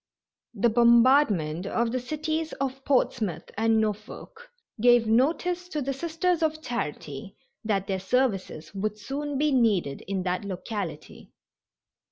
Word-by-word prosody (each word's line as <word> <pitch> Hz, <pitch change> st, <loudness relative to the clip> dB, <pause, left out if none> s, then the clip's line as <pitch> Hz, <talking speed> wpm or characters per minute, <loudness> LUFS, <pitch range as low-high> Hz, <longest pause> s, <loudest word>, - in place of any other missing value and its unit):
The 235 Hz, +3 st, +3 dB
bombardment 235 Hz, -, +4 dB
of 230 Hz, +2 st, 0 dB
the 255 Hz, -, -1 dB
cities 310 Hz, +4 st, -3 dB
of 270 Hz, 0 st, -4 dB
Portsmouth 235 Hz, -, 0 dB
and 225 Hz, +1 st, +2 dB
Norfolk 220 Hz, -, -5 dB, 0.3 s
gave 240 Hz, -1 st, +5 dB
notice 340 Hz, +10 st, +1 dB
to 305 Hz, -, -3 dB
the 275 Hz, -1 st, -2 dB
Sisters 335 Hz, +4 st, -1 dB
of 315 Hz, -1 st, 0 dB
Charity 150 Hz, -, -5 dB, 0.3 s
that 200 Hz, -3 st, 0 dB
their 190 Hz, -1 st, -2 dB
services 195 Hz, -7 st, -1 dB
would 210 Hz, +2 st, -2 dB
soon 280 Hz, +6 st, -4 dB
be 300 Hz, +2 st, +2 dB
needed 210 Hz, -, +2 dB
in 190 Hz, -1 st, -2 dB
that 180 Hz, +2 st, -1 dB
locality. 185 Hz, -4 st, -6 dB
235 Hz, 130 wpm, -26 LUFS, 195-285 Hz, 0.3 s, gave